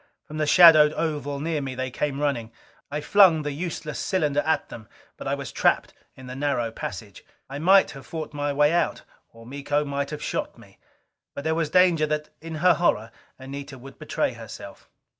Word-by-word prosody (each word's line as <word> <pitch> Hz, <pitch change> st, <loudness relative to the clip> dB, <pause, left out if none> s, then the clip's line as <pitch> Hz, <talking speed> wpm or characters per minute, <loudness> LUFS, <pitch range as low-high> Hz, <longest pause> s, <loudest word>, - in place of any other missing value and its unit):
From 155 Hz, -, -9 dB
the 155 Hz, -1 st, 0 dB
shadowed 155 Hz, -2 st, +7 dB
oval 145 Hz, -4 st, -3 dB
near 155 Hz, 0 st, -2 dB
me 135 Hz, -2 st, -5 dB
they 130 Hz, 0 st, -4 dB
came 140 Hz, +1 st, -2 dB
running. 130 Hz, -6 st, -2 dB, 0.4 s
I 150 Hz, +1 st, -3 dB
flung 170 Hz, -1 st, +5 dB
the 145 Hz, -, -3 dB
useless 155 Hz, 0 st, -5 dB
cylinder 150 Hz, -7 st, 0 dB
at 160 Hz, -, 0 dB
them. 110 Hz, -2 st, -11 dB, 0.3 s
But -, -, -8 dB
I -, -, 0 dB
was -, -, -7 dB
trapped -, -, +1 dB, 0.2 s
in 130 Hz, -, -12 dB
the 125 Hz, 0 st, -8 dB
narrow 135 Hz, -5 st, -1 dB
passage. 100 Hz, -2 st, -8 dB, 0.2 s
I 140 Hz, +2 st, -7 dB
might 190 Hz, +5 st, +5 dB
have 135 Hz, -4 st, -12 dB
fought 160 Hz, -2 st, -6 dB
my 145 Hz, 0 st, -2 dB
way 150 Hz, +2 st, +3 dB
out. 175 Hz, -, 0 dB, 0.3 s
Or 115 Hz, 0 st, -15 dB
Miko 145 Hz, +3 st, -2 dB
might 140 Hz, 0 st, -3 dB
have 150 Hz, -, -6 dB
shot -, -, -3 dB
me. -, -, -18 dB, 0.6 s
But 140 Hz, -, -6 dB
there 160 Hz, +1 st, 0 dB
was 160 Hz, -2 st, -1 dB
the 180 Hz, -, +2 dB
danger 170 Hz, -4 st, +4 dB
that, 150 Hz, 0 st, -3 dB
in 165 Hz, 0 st, -7 dB
her 180 Hz, +3 st, +4 dB
horror, 115 Hz, -10 st, 0 dB, 0.3 s
Anita 140 Hz, +1 st, -8 dB
would 135 Hz, +2 st, -13 dB
betray -, -, -1 dB
herself. -, -, -11 dB
145 Hz, 195 wpm, -24 LUFS, 135-160 Hz, 0.6 s, shadowed